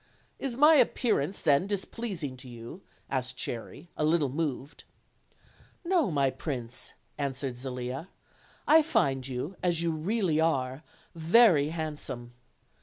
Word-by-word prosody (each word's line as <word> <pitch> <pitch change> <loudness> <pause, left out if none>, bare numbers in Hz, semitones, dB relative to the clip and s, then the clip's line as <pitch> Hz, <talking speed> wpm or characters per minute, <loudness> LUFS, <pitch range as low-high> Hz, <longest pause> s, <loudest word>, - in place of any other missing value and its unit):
"Is 255 -3 -3
my 300 +3 +7
appearance 220 - +1
then 145 +6 +3
displeasing 195 - -3
to 125 0 -10
you?" 120 +9 -9 0.3
asked 125 -1 -2
Cherry, 140 +8 -5
a - - -1
little 155 -2 +2
moved. 145 0 -4 1.0
"No, 345 - +2
my 140 -4 +2
prince," 125 -6 -5 0.3
answered 135 -3 -3
Zelia; 130 +5 -5 0.6
"I 315 +2 +8
find 165 - +1
you, 135 +8 -4
as 170 -2 +2
you 170 - +1
really 170 0 0
are, 135 -4 0 0.3
very 165 -2 +5
handsome. 150 -7 -5
155 Hz, 120 wpm, -29 LUFS, 130-190 Hz, 1.0 s, I